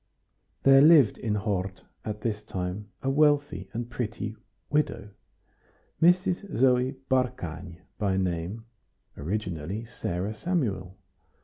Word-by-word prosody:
There 135 Hz, 0 st, +8 dB
lived 150 Hz, -7 st, +6 dB
in 105 Hz, -2 st, -1 dB
Hort 100 Hz, -2 st, -2 dB, 0.2 s
at 105 Hz, -1 st, -5 dB
this 105 Hz, -2 st, -2 dB
time 95 Hz, +3 st, -5 dB
a 135 Hz, -, +1 dB
wealthy 145 Hz, -, +2 dB
and 115 Hz, +1 st, -4 dB
pretty 110 Hz, -3 st, -4 dB, 0.3 s
widow, 150 Hz, -8 st, 0 dB, 0.9 s
Mrs. 180 Hz, +3 st, +2 dB
Zoe 125 Hz, +1 st, +3 dB
Barkany 90 Hz, -10 st, -2 dB, 0.2 s
by 95 Hz, -2 st, +1 dB
name, 95 Hz, +4 st, -2 dB, 0.5 s
originally 90 Hz, +3 st, -3 dB
Sarah 100 Hz, -4 st, -3 dB
Samuel. 105 Hz, -, -2 dB
110 Hz, 105 wpm, -27 LUFS, 95-135 Hz, 0.9 s, There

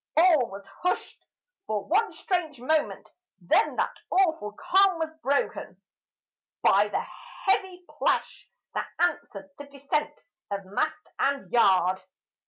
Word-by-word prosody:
All 315 Hz, -8 st, +5 dB
was 195 Hz, +1 st, -9 dB
hushed 265 Hz, -, -4 dB, 0.4 s
for 210 Hz, -2 st, -2 dB
one 410 Hz, +5 st, +2 dB
strange 335 Hz, -, -2 dB
moment; 300 Hz, +5 st, -1 dB, 0.3 s
then 190 Hz, -, +2 dB
that -, -, -1 dB
awful 320 Hz, -, +2 dB
calm 380 Hz, -, +3 dB
was 320 Hz, -1 st, -2 dB
broken 280 Hz, 0 st, -1 dB, 0.8 s
By 205 Hz, +2 st, +5 dB
the -, -, -1 dB, 0.4 s
heavy 380 Hz, -2 st, 0 dB
plash -, -, -1 dB, 0.2 s
that -, -, -3 dB
answered 285 Hz, -, -1 dB
the 285 Hz, -, -8 dB
descent 280 Hz, +2 st, -3 dB, 0.3 s
of 200 Hz, -1 st, -4 dB
mast 190 Hz, +2 st, -2 dB
and 280 Hz, 0 st, 0 dB
yard. 190 Hz, -5 st, +4 dB
285 Hz, 120 wpm, -27 LUFS, -, 0.8 s, All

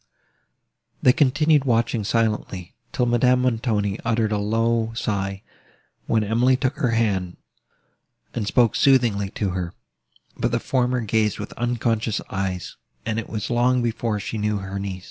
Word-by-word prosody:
They 125 Hz, -, +6 dB
continued 145 Hz, +2 st, +3 dB
watching 115 Hz, -2 st, +1 dB
silently, 105 Hz, -4 st, -1 dB, 0.2 s
till 125 Hz, -, +1 dB
Madame 125 Hz, +1 st, +3 dB
Montoni 110 Hz, -4 st, 0 dB
uttered 115 Hz, -1 st, +1 dB
a 105 Hz, -, +1 dB
low 115 Hz, +2 st, 0 dB
sigh, 100 Hz, -3 st, -2 dB, 0.6 s
when 110 Hz, -1 st, +2 dB
Emily 120 Hz, +5 st, +3 dB
took 130 Hz, +2 st, -1 dB
her 125 Hz, -, +1 dB
hand, 100 Hz, -6 st, 0 dB, 1.0 s
and 110 Hz, -4 st, -3 dB
spoke 120 Hz, 0 st, +3 dB
soothingly 120 Hz, -8 st, +3 dB
to 100 Hz, -3 st, -1 dB
her; 90 Hz, -2 st, -4 dB, 0.6 s
but -, -, 0 dB
the -, -, +1 dB
former 125 Hz, -1 st, 0 dB
gazed 110 Hz, -1 st, +1 dB
with -, -, -7 dB
unconscious 115 Hz, -2 st, -1 dB
eyes, 95 Hz, -2 st, -3 dB, 0.3 s
and 110 Hz, +1 st, -1 dB
it 115 Hz, -, -7 dB
was 110 Hz, +1 st, -4 dB
long 125 Hz, +1 st, +2 dB
before 115 Hz, -2 st, -1 dB
she 110 Hz, +2 st, -4 dB
knew 105 Hz, 0 st, 0 dB
her 95 Hz, 0 st, -5 dB
niece. 95 Hz, -1 st, -4 dB
115 Hz, 145 wpm, -23 LUFS, 100-120 Hz, 1.0 s, They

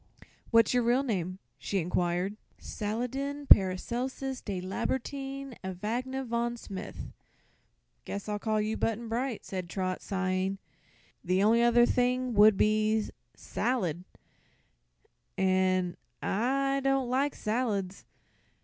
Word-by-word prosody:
"What's 230 Hz, -1 st, +5 dB
your 250 Hz, -, +3 dB
real 240 Hz, +3 st, +3 dB
name?" 185 Hz, -7 st, -2 dB, 0.2 s
she 200 Hz, -, -2 dB
inquired. 180 Hz, +2 st, 0 dB, 0.2 s
"Saladin 265 Hz, +7 st, -3 dB
Paracelsus 250 Hz, +7 st, +3 dB
de 195 Hz, -3 st, -4 dB
Lambertine 270 Hz, +7 st, -3 dB
Evagne 235 Hz, +8 st, -3 dB
von 235 Hz, 0 st, -1 dB
Smith." 195 Hz, -4 st, -7 dB, 0.9 s
"Guess 200 Hz, +1 st, -5 dB
I'll 210 Hz, -1 st, -2 dB
call 215 Hz, 0 st, 0 dB
you 215 Hz, +1 st, -1 dB
Button 225 Hz, +1 st, -1 dB
Bright," 240 Hz, +1 st, -2 dB
said 185 Hz, -3 st, -5 dB
Trot, 185 Hz, 0 st, -2 dB
sighing. 190 Hz, 0 st, -1 dB, 0.7 s
"The 185 Hz, +2 st, +2 dB
only 230 Hz, +3 st, +5 dB
other 240 Hz, 0 st, +6 dB
thing 250 Hz, 0 st, +1 dB
would 210 Hz, -1 st, +7 dB
be 215 Hz, +1 st, +2 dB, 0.3 s
'Salad,' 185 Hz, -, -1 dB, 1.3 s
an' 185 Hz, -1 st, +2 dB, 0.2 s
I 275 Hz, +6 st, 0 dB
don't 270 Hz, -1 st, +2 dB
like 270 Hz, +3 st, +1 dB
salads. 210 Hz, -4 st, -2 dB
220 Hz, 110 wpm, -30 LUFS, 190-250 Hz, 1.3 s, would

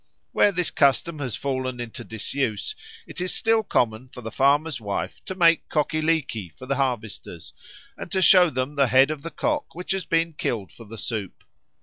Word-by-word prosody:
Where 205 Hz, -, +4 dB
this 180 Hz, -3 st, -1 dB
custom 145 Hz, +3 st, +2 dB
has 130 Hz, -5 st, -3 dB
fallen 130 Hz, -2 st, -3 dB
into 120 Hz, -2 st, -6 dB
disuse, 115 Hz, -, -3 dB, 0.3 s
it -, -, -7 dB
is 180 Hz, -, 0 dB
still 225 Hz, 0 st, +3 dB
common 125 Hz, -, 0 dB
for 125 Hz, -, -10 dB
the 110 Hz, -1 st, -6 dB
farmer's 140 Hz, 0 st, +2 dB
wife 100 Hz, -2 st, -4 dB
to 190 Hz, -, -5 dB
make 170 Hz, -2 st, +4 dB
cockie 155 Hz, +1 st, 0 dB
leekie 155 Hz, -, 0 dB
for 130 Hz, -, -9 dB
the 135 Hz, 0 st, -1 dB
harvesters, 105 Hz, -, -3 dB, 0.4 s
and -, -, -8 dB
to 190 Hz, -, +1 dB
show 180 Hz, -2 st, +7 dB
them 130 Hz, 0 st, -2 dB
the 140 Hz, -2 st, +3 dB
head 130 Hz, +4 st, +5 dB
of 155 Hz, -2 st, -5 dB
the 165 Hz, -, -6 dB
cock 295 Hz, -, -2 dB
which 180 Hz, +3 st, -5 dB
has 190 Hz, -3 st, -1 dB
been 165 Hz, 0 st, +1 dB
killed 110 Hz, -9 st, -3 dB
for 115 Hz, -, -13 dB
the 110 Hz, +2 st, -10 dB
soup. 105 Hz, -3 st, -5 dB
140 Hz, 195 wpm, -24 LUFS, 115-165 Hz, 0.4 s, show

